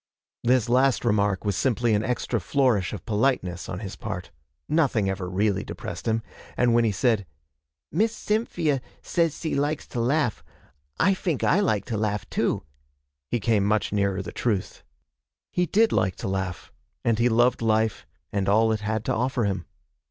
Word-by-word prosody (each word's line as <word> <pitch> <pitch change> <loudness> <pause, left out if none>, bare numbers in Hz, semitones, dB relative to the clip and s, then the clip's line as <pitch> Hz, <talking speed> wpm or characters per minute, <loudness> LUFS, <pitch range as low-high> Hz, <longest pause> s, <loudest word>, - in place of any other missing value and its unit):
This 125 -1 +3
last 130 +1 +3
remark 105 -3 +1
was 100 -2 +1
simply 120 0 +1
an 105 0 +2
extra 125 -1 -1
flourish 120 -3 +1
of 105 - -7
politeness 105 -7 0
on 90 - -4
his 100 -3 -6
part. - - -6 0.4
Nothing 135 -10 +2
ever 95 -2 -2
really 100 +2 +1
depressed - - -7
him, 110 0 +1 0.3
and 120 -1 +3
when 120 0 +4
he 110 - +2
said, 105 -1 +1 0.6
'Miss 220 +2 +2
Cyn 220 0 -1
fee 160 -4 0
ia 135 -2 -1 0.2
says 165 -3 +1
s'e 160 - -3
likes 145 +2 0
to 120 - -4
laugh; 125 0 +1 0.6
I 195 - +4
fink 175 -6 -2
I 185 - +4
like 110 - +1
to 115 -3 -3
laugh 105 -2 -1
too,' - - 0 0.7
he 120 - 0
came 105 -1 +2
much 105 +1 +1
nearer 100 -1 +1
the - - -7
truth. 105 -6 -2 0.7
He 180 0 +1
did 220 +4 +3
like 95 -1 +1
to - - -5
laugh, 95 -2 -3 0.3
and 115 -1 +2
he 120 +1 +4
loved 120 +2 +3
life 110 -1 +1 0.3
and 100 -1 0
all 110 +2 +4
it 110 - 0
had 110 +1 -2
to - - +1
offer 125 +1 0
him. 95 -4 -2
110 Hz, 180 wpm, -25 LUFS, 100-130 Hz, 0.7 s, when